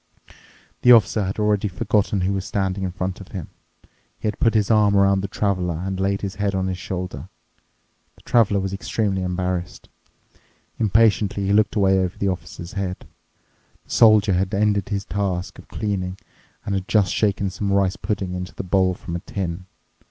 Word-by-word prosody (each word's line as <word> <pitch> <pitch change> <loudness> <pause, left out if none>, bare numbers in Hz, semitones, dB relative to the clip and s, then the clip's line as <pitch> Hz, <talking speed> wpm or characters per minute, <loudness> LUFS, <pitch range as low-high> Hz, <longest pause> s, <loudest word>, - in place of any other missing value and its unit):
The 125 - +6
Officer 110 -2 +5
had 95 +3 -4
obviously 105 -1 +1
forgotten 105 -3 +1
who 95 +2 0
was 95 -1 -2
standing 95 -1 -2
in 95 - -2
front 90 +2 -4
of 95 - -10
him. 90 -6 -6 0.7
He - - -3
had 105 - -3
put 115 -1 +2
his 105 0 +2
arm 105 -2 +4
around 100 0 +4
the 100 - -3
Traveler 95 -4 -1
and 95 +2 -4
laid 100 +1 0
his 100 -2 -3
head 100 -1 0
on 95 -1 0
his 95 -1 -3
shoulder. 90 -1 -5 0.9
The - - -21
Traveler 105 -4 +3
was 95 0 -3
extremely 95 +1 -1
embarrassed. 90 -1 -3 0.9
Impatiently 105 -2 +2
he 100 - +1
looked 105 +1 +3
away 95 -2 +3
over 95 0 -2
the 100 - 0
Officer's 85 -1 -6
head. 95 -2 -4 0.8
The - - -17
Soldier 110 -3 +5
had 95 +3 0
ended 100 -1 +1
his 100 -2 -2
task 95 -3 -3
of - - -14
cleaning 95 -3 -3 0.5
and 100 - -2
had 95 0 -2
just 100 -3 +2
shaken 100 -2 0
some 100 +1 -2
rice 100 -1 +2
pudding 100 -4 -3
into 90 0 -6
the - - -4
bowl 95 0 +2
from 85 -1 -7
a - - -2
tin. 90 -1 -5
95 Hz, 180 wpm, -22 LUFS, 95-105 Hz, 0.9 s, The